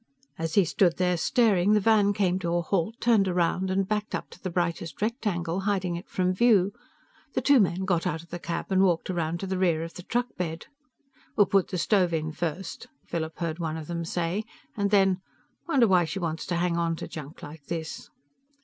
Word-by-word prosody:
As 165 0 -2
he 200 - +5
stood 170 +1 +2
there 180 -1 +2
staring, 205 0 +3
the 210 - +5
van 210 -1 +4
came 190 -2 +1
to 170 -1 -1
a 175 - +1
halt, 195 +4 -1
turned 225 -5 +3
around 180 +1 +1
and 190 0 +1
backed 210 0 -1
up - - -6
to - - -14
the 185 - -3
brightest 170 -1 -2
rectangle, 195 -6 -1
hiding 190 -3 -1
it 170 - -8
from 185 0 +1
view. 200 -2 +4 0.6
The - - 0
two 285 -2 +5
men 190 -2 +1
got 180 -1 +1
out 165 -2 -3
of 170 - -20
the 175 - -4
cab 170 +3 -4
and 190 0 +4
walked 180 -1 +2
around 170 -1 -2
to - - -2
the 190 -1 -2
rear 170 -4 +2
of 165 - -7
the 180 - -8
truckbed. 180 -7 -3 0.7
"We'll 205 - +6
put 195 -1 +2
the 185 - -3
stove 180 -2 +2
on 155 0 -2
first," 170 +3 -4 0.2
Philip 160 -1 -4
heard 165 -1 -3
one 160 -1 -2
of 160 - -6
them 170 +1 -3
say. 175 +4 -2 0.3
And 200 -1 0
then, 195 -2 +3 0.5
"Wonder 270 -8 +4
why 180 -3 +4
she 165 +5 -4
wants 165 -3 -3
to 175 - -1
hang 170 0 0
onto 165 -1 -1
junk 150 0 -9
like 150 0 -10
this?" 165 -2 -5
180 Hz, 210 wpm, -27 LUFS, 170-195 Hz, 0.7 s, We'll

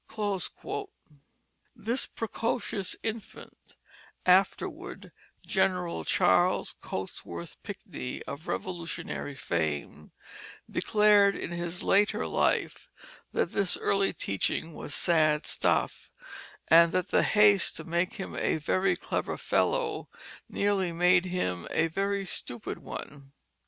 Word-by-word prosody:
This 235 +5 -1
precocious 225 -3 -2
infant, 225 -1 -7 0.5
afterward 185 +2 +1 0.3
General 180 - 0
Charles - - +3
Cotesworth 85 0 -6
Pinckney 125 - -6
of 140 +4 -8
Revolutionary 170 -5 -4
fame, 75 - -3 0.6
declared 210 -2 +4
in - - -5
his 170 +1 -3
later 205 +1 +3
life - - 0 0.4
that - - 0
this 195 -2 +1
early 195 0 +1
teaching 130 - -2
was 145 - -5
sad 155 -3 +3
stuff, - - 0 0.6
and 165 +1 +7
that 185 - 0
the - - +4
haste 205 -3 +4
to - - -5
make 175 +2 0
him 195 - -6
a - - +1
very 185 +4 +1
clever 180 - -3
fellow 465 -4 0 0.4
nearly 200 -3 +1
made 180 +2 +4
him 90 - -2
a 160 - +2
very 195 +4 -1
stupid 120 - -3
one. 140 -1 -9
180 Hz, 105 wpm, -29 LUFS, 155-200 Hz, 0.6 s, and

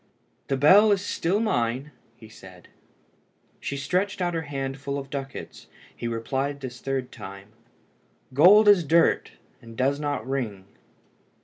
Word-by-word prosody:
"The 135 - 0
bell 195 +10 +6
is 200 0 +1
still 185 +2 0
mine," 130 - -1 0.4
said 95 -4 -15
he. - - -23 0.9
She 140 - -4
stretched 185 +9 -1
out 175 -1 -1
her 165 - -1
hand 135 -1 -4
full 140 0 -4
of 135 -1 -7
ducats. 135 -1 -7 0.3
He 120 - -5
replied 135 +5 -3
this 125 -2 -8
third 135 -2 -3
time 100 +1 -10 0.8
"Gold 195 +10 +7
is 200 -4 +6
dirt, 165 +2 +2 0.3
and 115 -1 -13
does 140 +2 +1
not 145 -6 -3
ring." 115 -8 -3
140 Hz, 140 wpm, -25 LUFS, 125-165 Hz, 0.9 s, Gold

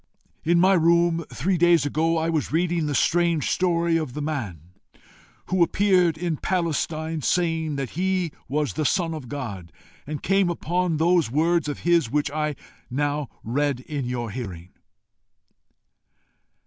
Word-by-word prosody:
"In 170 +1 +3
my 190 +2 +5
room, 170 -1 +3
three 180 +5 -1
days 170 -4 +4
ago, 160 +3 +1
I 160 0 0
was 155 -3 -1
reading 165 0 +1
the 145 - -1
strange 170 -1 +2
story 170 -2 +2
of 155 -6 -3
the 150 - -3
man 100 - -5 0.8
who 185 -1 +1
appeared 180 -2 +3
in 165 -2 -2
Palestine 160 -2 -1
saying 165 -2 0
that 135 -3 -4
he 185 -1 0 0.2
was 150 +3 -1
the 155 - -2
Son 165 +2 +1
of 145 -7 -7
God, 100 -12 -6 0.4
and 150 0 -5
came 195 -1 +2
upon 175 0 -1
those 170 -2 +3
words 160 +4 +1
of 145 - -5
his 170 -7 +2
which 145 +2 0
I 150 0 -1
have 150 - -4 0.3
now 145 +1 -1
read 135 +2 -1
in 140 -1 -4
your 120 -2 -3
hearing. 95 -8 -7
160 Hz, 150 wpm, -24 LUFS, 145-170 Hz, 0.8 s, my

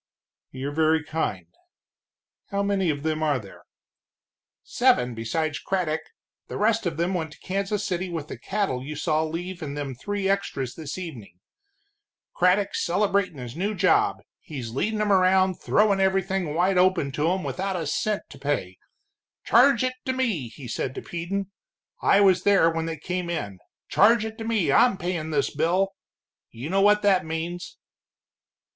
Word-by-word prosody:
"You're 135 +2 -5
very 160 +1 +2
kind. 150 - -2 1.0
How 200 0 0
many 200 -3 +1
of 145 -2 -2
them 155 0 -1
are 150 -3 +2
there?" 100 -6 -11 1.0
"Seven 125 0 +2
besides 145 +7 -2
Craddock, 175 -5 -1 0.5
the - - -5
rest 220 -1 +2
of 165 -2 -3
them 170 +3 0
went 160 -4 -3
to - - -18
Kansas 200 +2 -2
City 185 -1 -2
with 160 -4 -4
the - - -8
cattle 190 -11 -2
you 150 +3 -6
saw 155 +1 +1
leave 175 +3 -5
in 145 -2 -5
them 145 -2 -4
three 200 +9 -3
extras 175 -10 -1
this 155 -1 -6
evening. 130 - -8 1.0
Craddock's 185 +3 +2
celebratin' 195 -2 +1
his 125 -1 -7
new 200 +5 -1
job, 185 -1 +2 0.2
he's 130 -7 -7
leadin' 210 - -1
'em 210 -1 +1
around 185 -1 +3
throwin' 205 -2 +3
everything 190 -4 0
wide 180 +2 +3
open 180 -6 +3
to 150 +5 +1
'em 185 0 -1
without 195 0 -2
a 170 -3 -2
cent 210 +8 -1
to 135 - -12
pay. 115 -11 -2 0.6
'Charge 250 +1 +5
it 255 0 0
to 260 - 0
me' 220 - -1
he 125 +2 -10
said 130 +4 -3
to - - -6
Peden 190 +3 -4 0.5
I 200 - +5
was 190 -3 +5
there 195 -5 +4
when 165 0 -2
they 165 -1 -4
came 180 +3 -3
in 100 - -4 0.3
'charge 220 +2 +4
it 220 +1 -7
to - - -4
me, 225 -6 +1
I'm 245 -6 +5
payin' 175 -3 -3
this 145 -2 0
bill.' 180 +6 +1 0.6
You 130 +8 -7
know 195 +1 +3
what 210 +1 +4
that 195 -4 +4
means." 165 +2 -5
175 Hz, 165 wpm, -25 LUFS, 150-195 Hz, 1.0 s, Charge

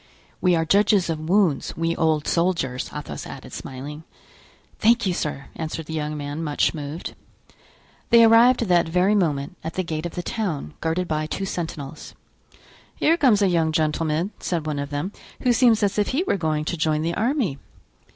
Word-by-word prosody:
We 180 -2 +4
are 165 0 +1
judges 200 0 +3
of 155 0 -5
wounds, 185 -6 +2
we 165 0 0
old 155 -2 +1
soldiers," 165 -8 0
Athos - - -6
added, - - -10
smiling. 140 +4 -7 0.8
"Thank 235 +1 +4
you, 185 - +1
sir," 145 -5 -4
answered 160 0 -4
the 160 - -7
young 150 -1 -3
man, 145 +2 -4
much 150 -2 +1
moved. 150 +1 -6 1.0
They 235 0 +7
arrived 230 +3 +6
that 175 -6 +2
very 180 +4 +3
moment 160 -5 0
at 160 +1 -5
the 185 - 0
gate 160 -1 -3
of 170 - -11
the 175 - -3
town, 175 - -3
guarded 170 +2 -1
by 155 0 -1
two 195 - -3
sentinels. 155 -6 -6 0.8
"Here 325 - +3
comes 240 -11 +4
a - - +4
young 165 -3 +2
gentleman," 155 +3 0
said 170 -4 -2
one 150 -2 -2
of 140 0 -4
them, 145 +7 -3 0.3
"who 250 -2 +3
seems 235 -3 +4
as 200 +1 +1
if 205 - +2
he 290 +7 0
were 380 - 0
going 155 -4 -1
to 175 - -2
join 155 -1 +1
the 170 +1 -1
army." 225 - 0
165 Hz, 180 wpm, -23 LUFS, 155-200 Hz, 1.0 s, They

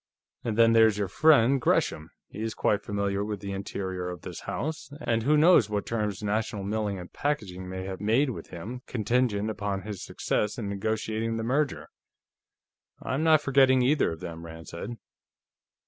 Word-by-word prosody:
And 110 -2 -2
then 115 0 +6
there 115 -1 +7
is 105 -2 0
your 100 -1 0
friend 135 - +4
Gresham; 80 -8 +1 0.2
he 105 - -8
is 110 0 -3
quite 105 - +1
familiar 100 -1 -1
with 105 -1 -4
the 100 0 -6
interior 95 -2 -4
of 90 -3 -8
this - - -7
house, 155 -1 -4
and 115 -6 0
who 150 +6 +3
knows 155 - +6
what 105 -1 -2
terms 105 -3 -2
National 105 -1 -1
Milling 100 -3 -2
& - - -52
Packaging 95 -11 -3
may 95 0 -5
have 95 0 -6
made 120 +7 +2
with - - -8
him, 110 +9 -7
contingent 110 -2 0
upon 100 -2 -3
his 105 -3 -6
success 105 0 -1
in 110 -4 -4
negotiating 110 +2 -2
the 115 - -2
merger?" 140 +4 0 1.1
"I'm 135 +5 -2
not 160 -2 +5
forgetting 135 -2 +4
either 140 - +2
of 80 - -11
them," 85 -1 -7
Rand 80 0 -10
said. 100 +8 -6
105 Hz, 180 wpm, -27 LUFS, 100-125 Hz, 1.1 s, there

